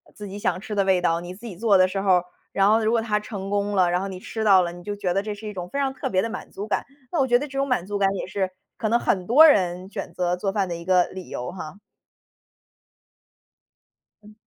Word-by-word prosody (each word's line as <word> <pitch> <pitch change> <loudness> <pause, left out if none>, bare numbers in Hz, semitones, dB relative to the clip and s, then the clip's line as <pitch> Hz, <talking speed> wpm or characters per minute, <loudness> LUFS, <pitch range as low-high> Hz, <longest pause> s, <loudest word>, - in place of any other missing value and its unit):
自 210 - -8
己 200 +1 -7
想 185 - -1
吃 210 - -6
的 200 -1 +1
味 190 -2 +3
道， 165 -1 +2
你 175 +1 -7
自 215 +5 -13
己 200 -7 -7
做 210 -1 +4
的 185 - +6
时 195 - -2
候 195 0 +2
儿， - - -9 0.3
然 195 +1 +4
后 220 +1 +4
如 220 0 +1
果 230 -1 +2
它 215 -2 0
成 200 -2 -6
功 205 0 0
了， 180 -2 +3
然 180 - +1
后 195 - -3
你 185 -1 -7
吃 220 - -5
到 195 -3 +7
了， 175 -1 -2
你 175 0 -11
就 205 +2 -4
觉 190 -3 -1
得 195 - +1
这 210 0 -5
是 210 +2 -11
一 - - -5
种 180 -3 -6
非 280 - -5
常 275 -1 0
特 - - -4
别 185 -1 +2
的 230 - -2
满 - - -7
足 200 - -6
感。 215 - -1 0.3
那 345 - 0
我 265 - +3
觉 245 -1 +5
得 280 - -3
这 275 -1 -5
种 275 - +1
满 250 -10 0
足 205 +1 -3
感 195 - +4
也 - - -3
是 190 0 -2 0.3
可 220 - -1
能 235 +2 +3
很 185 -5 0
多 290 +8 +8
人 185 - +3
选 185 - -5
择 180 0 0
做 195 +2 -2
饭 195 -2 0
的 175 - -4
一 170 - -8
个 180 -1 +4
理 185 -1 -9
由 125 - -5
哈。 180 0 -8 2.5
嗯。 210 +1 -15
195 Hz, 300 characters per minute, -24 LUFS, 185-215 Hz, 2.5 s, 多